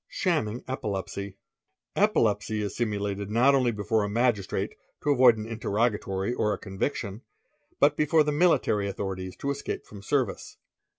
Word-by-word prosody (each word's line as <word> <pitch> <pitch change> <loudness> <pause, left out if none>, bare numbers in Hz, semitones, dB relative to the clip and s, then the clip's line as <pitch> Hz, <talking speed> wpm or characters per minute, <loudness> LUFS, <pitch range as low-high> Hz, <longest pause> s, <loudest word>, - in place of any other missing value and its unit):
Shamming 135 - -1
Epilepsy. 100 -5 -3
_ - - -27 0.6
Epilepsy 110 - +2
is 100 - -4
simulated 100 -3 -2
not 120 +6 +4
only 130 -3 +3
before 110 +1 0
a 105 - -1
magistrate 115 -3 0 0.3
to 145 - +2
avoid 125 -4 +6
an 110 - -5
terrogatory 105 -2 0
or 105 -3 +1
a - - -3
conviction, 100 +1 -4 0.6
but 145 +1 +4
before 155 +1 +4
the 150 - 0
military 145 - +2
authorities 95 -2 -4
to 140 - -2
ese 140 0 -5 0.2
from 100 -1 -11
service. 130 +4 -2
110 Hz, 145 wpm, -27 LUFS, 100-135 Hz, 0.6 s, avoid